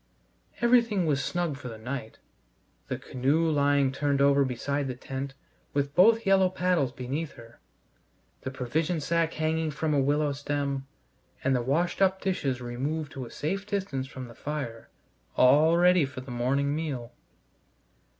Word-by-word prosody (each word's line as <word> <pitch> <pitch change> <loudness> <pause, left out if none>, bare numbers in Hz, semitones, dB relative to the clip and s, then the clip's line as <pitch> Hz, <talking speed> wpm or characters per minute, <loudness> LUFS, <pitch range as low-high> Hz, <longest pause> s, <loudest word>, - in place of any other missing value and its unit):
Everything 235 -6 +4
was 140 -3 +1
snug 175 -5 -1
for 130 - -8
the 115 -2 -7
night; 115 0 -6 0.7
the - - -3
canoe 140 +6 0
lying 145 -3 +3
turned 140 0 0
over 140 0 +5
beside 140 +2 -2
the 130 - -4
tent, 135 +2 -6 0.4
with 140 0 0
both 225 +6 +5
yellow 190 -1 +4
paddles 180 -7 +1
beneath 140 +4 -4
her; 115 -2 -15 0.8
the - - -4
provision 150 +6 -1
sack 165 +1 0
hanging 160 0 0
from 150 +1 -1
a 145 - +3
willow 145 +2 +2
stem, 140 -1 -2 0.6
and 130 0 +2
the 125 - +1
washed 165 +10 0
up 190 0 +3
dishes 140 -10 -1
removed 140 +5 -3
to 130 -2 -6
a - - -10
safe 195 - -3
distance 190 -11 -2
from 130 -1 -8
the 115 - -12
fire, 135 -5 -5 0.5
all 150 +6 +6
ready 180 -1 +5
for 135 -1 -5
the 130 0 -9
morning 135 +4 0
meal. 135 -7 -4
140 Hz, 155 wpm, -28 LUFS, 130-165 Hz, 0.8 s, all